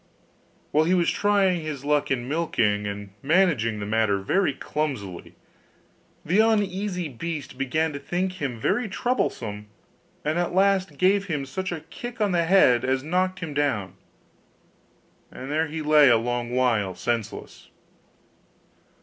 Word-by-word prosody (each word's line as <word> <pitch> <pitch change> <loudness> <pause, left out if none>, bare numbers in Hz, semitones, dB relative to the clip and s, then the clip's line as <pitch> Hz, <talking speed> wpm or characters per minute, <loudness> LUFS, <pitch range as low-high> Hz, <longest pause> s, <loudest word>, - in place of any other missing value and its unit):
While 155 +1 +3
he 180 +3 +3
was 175 -2 +2
trying 195 -4 +2
his 150 -3 -6
luck 150 0 +1
in 125 -2 -1
milking, 115 -10 0
and 100 -1 -6
managing 140 - +2
the 100 - -4
matter 110 -1 +1
very 145 - +1
clumsily, 135 - -4 0.9
the 180 +6 +2
uneasy 200 -5 +1
beast 145 +1 -6
began 150 +4 -1
to 140 - -5
think 185 +4 -3
him 125 -5 -3
very 220 - 0
troublesome; 110 - -2 0.6
and 155 +3 0
at 175 0 -1
last 195 -1 +2
gave 195 +2 +3
him 150 -7 -3
such 190 +7 -4
a 165 -3 -4
kick 240 +9 -9
on 210 -2 +1
the 170 -2 +2
head 165 -10 +5
as 130 0 0
knocked 185 +4 -1
him 160 -3 -5
down; 135 -10 -1 1.4
and 130 +2 -8
there 160 +2 +1
he 155 +1 -5
lay 150 -2 +6
a 120 - +6
long 120 +1 -2
while 115 -7 +1
senseless. 120 -3 -4
150 Hz, 145 wpm, -25 LUFS, 120-185 Hz, 1.4 s, lay